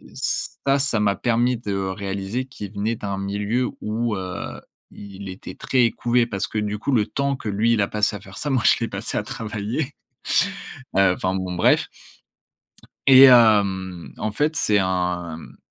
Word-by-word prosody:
ça, 135 0 -1
ça 130 -5 +1
m'a 100 -1 +2
permis 120 +1 +1
de 105 -3 -4
réaliser 95 +4 -3
qu'il 105 -7 -9
venait 105 +3 -1
d'un 100 -2 -4
milieu 100 +5 -1
où, 110 +1 -1
heu, 95 -2 -6 0.3
il 100 -1 -10
était 95 +1 -9
très 125 -3 +2
couvé 120 0 +1
parce 100 -2 -2
que 110 - -3
du 105 0 -2
coup, 140 - -2
le 110 -4 +2
temps 140 0 -1
que 110 - -5
lui, 110 +3 +2
il 110 - +2
a 100 - +1
passé 105 0 0
à - - -6
faire 95 -1 -13
ça, 150 - -3
moi, 130 -3 +2
je - - +6
l'ai 115 - 0
passé 100 +3 -3
à - - 0
travailler, 115 +4 -4 1.0
heu, 95 -2 +5
enfin, 95 - -1
bon, 95 -1 -3
bref. 90 - +3 1.2
Et 130 0 +9
hem, 100 -7 +4
en 110 - -2
fait, 150 +7 0
c'est 105 -6 +2
un, 90 -3 -1
hem, 80 - -11
105 Hz, 180 wpm, -22 LUFS, 95-120 Hz, 1.2 s, Et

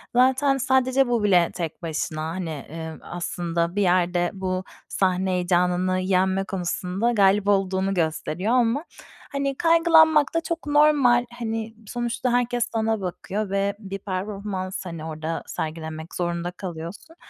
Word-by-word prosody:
Zaten, 265 +2 +4
sadece, 260 0 +2
bu 240 -3 +1
bile 180 -4 +4
tek 170 -3 -5
başına, 155 -1 -3
hani, 160 -3 -4
ııı, 160 -1 -6
aslında, 170 0 -2
bir 205 - +1
yerde, 175 -1 +2
bu, 185 -1 -2 0.3
sahne 185 0 +1
heyecanını 180 +1 +1
yenme 190 +1 +1
konusunda 190 +3 -1
galip 200 -2 +3
olduğunu 195 -1 +1
gösteriyor 170 +5 -1
ama, 250 +4 +2 0.5
hani, 275 -1 -1
kaygılanmak 325 -3 +5
da 330 - +1
çok 335 -1 -4
normal, 290 -5 +4
hani, 225 -1 -3
sonuçta, 240 +1 -2
herkes 245 -1 +1
sana 220 -1 0
bakıyor 195 +3 -3
ve 200 +1 0
bir 195 -2 -6
performans, 190 -1 -4
hani, 165 -3 -6
orada 160 +1 -4
sergilemek 160 +1 -5
zorunda 175 0 -2
kalıyorsun. 180 - -8
195 Hz, 130 wpm, -24 LUFS, 175-240 Hz, 0.5 s, kaygılanmak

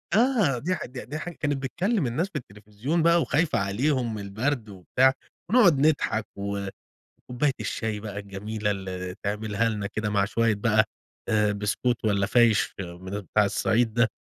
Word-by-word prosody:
آه 220 - +3
دي 180 +8 0
حاج 155 - -6
د 125 -3 -8
ده 150 - -3
حاجة 170 +1 -6
كانت 145 -2 +1
بتكلم 175 - 0
الناس 150 +11 0
في - - -30
التلفزيون 110 +7 -3
بقى 170 +1 +5
وخايفة 160 +1 +1
عليهم 120 +5 0
من 105 - -5
البرد 110 +4 -2
وبتاع، 115 +7 +2 0.4
ونقعُد 200 - +6
نضحك 125 -8 +1
و 100 0 -3 0.5
وكوباية 130 +3 -1
الشاي 110 -2 -2
بقى 105 -1 -6
الجميلة 105 +2 -3
اللي 95 -2 -4
تعملها 105 +2 0
لنا 105 -3 -2
كده 105 0 -3
مع 100 -1 +2
شوية 115 +2 +1
بقى 110 +1 +3 0.4
آآ، 105 -1 +3
بسكوت 105 +4 -1
والّا 100 -2 +2
فايش 115 -1 +3
من 90 +1 -7
أب 100 -1 -4
بتاع 105 +3 +2
الصعيد 110 +3 +1
ده. 120 -1 +4
110 Hz, 170 wpm, -26 LUFS, 100-135 Hz, 0.5 s, ونقعُد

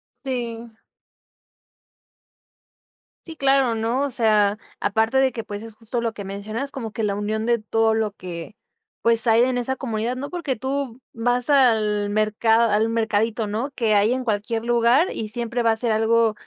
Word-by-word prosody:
Sí. 235 -3 -5 2.5
Sí, 325 - -9
claro, 270 -4 +3
¿no? 230 +4 0
O 285 - 0
sea, 215 -4 +2 0.2
aparte 225 +5 +1
de 265 -1 +3
que, 230 - -5
pues, 205 -1 -7
es 225 -1 -10
justo 235 +2 -4
lo 230 -1 -1
que 205 -3 -8
mencionas, 215 +7 -5
como 230 -6 -6
que 220 +2 -4
la 205 -1 +1
unión 215 +2 -2
de 235 0 +2
todo 225 +1 +1
lo 220 -2 -1
que, 180 +1 -8 0.5
pues, 230 0 +2
hay 225 +1 +5
en 250 0 +1
esa 265 +2 -2
comunidad. 235 -2 -2
No 280 +3 -6
porque 340 -7 -2
tú 265 0 -3
vas 245 +3 0
al 215 -6 +3
mercad 215 +2 +2
al 220 +2 +2
mercadito, 225 0 0
¿no? 220 +6 -3
Que 225 -3 +1
hay 210 +4 +3
en 260 - -2
cualquier 225 0 -2
lugar, 240 +7 +3
y 220 - -4
siempre 235 +2 -3
va 230 - +3
a - - +1
ser 230 +1 -1
algo, 225 0 +3
230 Hz, 175 wpm, -23 LUFS, 215-245 Hz, 2.5 s, hay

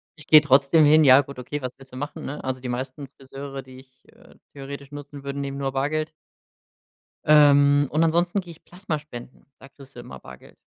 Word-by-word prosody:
Ich 150 - -14
gehe 155 -1 +8
trotzdem 145 +2 +4
hin, 155 +1 +5
ja 135 0 +7
gut, 140 -1 -11
okay, 135 +4 -5
was 130 - -4
willst 135 -1 -17
du 130 - -12
machen, 145 +2 -7
ne? 145 - -7
Also, 130 0 -4
die 125 - -6
meisten 130 +3 -6
Friseure, 135 0 -9
die 130 0 -15
ich, 130 -1 -23
äh, - - -21 0.2
theoretisch 140 0 -9
nutzen 145 -1 -10
würde, 140 0 -5
nehmen 140 0 -5
nur 135 -1 -3
Bargeld. 155 +3 -2 1.2
Ähm, 145 -1 +5
und 155 +2 +1
ansonsten 170 +4 +1
gehe 180 -3 -9
ich 165 - -17
Plasmaspenden, 155 -9 -8
da - - -14
kriegst 135 -1 -17
du - - -10
immer 65 - -11
Bargeld. - - -15
140 Hz, 200 wpm, -23 LUFS, 135-150 Hz, 1.2 s, gehe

